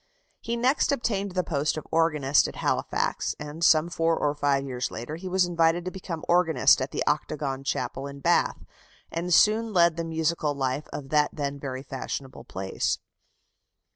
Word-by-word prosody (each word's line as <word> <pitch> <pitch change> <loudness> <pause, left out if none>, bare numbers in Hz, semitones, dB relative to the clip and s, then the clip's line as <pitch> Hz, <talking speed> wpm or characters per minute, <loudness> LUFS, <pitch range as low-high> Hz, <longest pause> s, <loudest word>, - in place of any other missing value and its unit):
He 235 +1 -3
next 255 +5 +2
obtained 200 -7 -1
the 180 0 +1
post 150 -1 -1
of 155 - -6
organist 150 -4 +3
at - - -8
Halifax; - - -1
and 150 +2 -6
some 160 -1 +5
four 165 -1 +1
or 145 - +1
five 140 -2 +1
years 125 -2 -3
later 120 +7 -6
he 185 +3 -6
was 185 0 +3
invited 170 0 +2
to 185 - -3
become 180 -4 -6
organist 160 -7 +4
at 130 - -2
the - - -2
Octagon 145 -2 -1
Chapel 135 0 -3
in 140 0 -9
Bath, - - +1 0.5
and 170 +2 -3
soon 215 +5 +4
led 170 -2 +4
the 165 - -1
musical 160 -2 -1
life 135 +1 -2
of 135 -2 -7
that 150 0 +3
then 140 -1 -3
very 130 -1 -5
fashionable 135 -1 -6
place. 95 0 -2
155 Hz, 170 wpm, -26 LUFS, 140-175 Hz, 0.5 s, some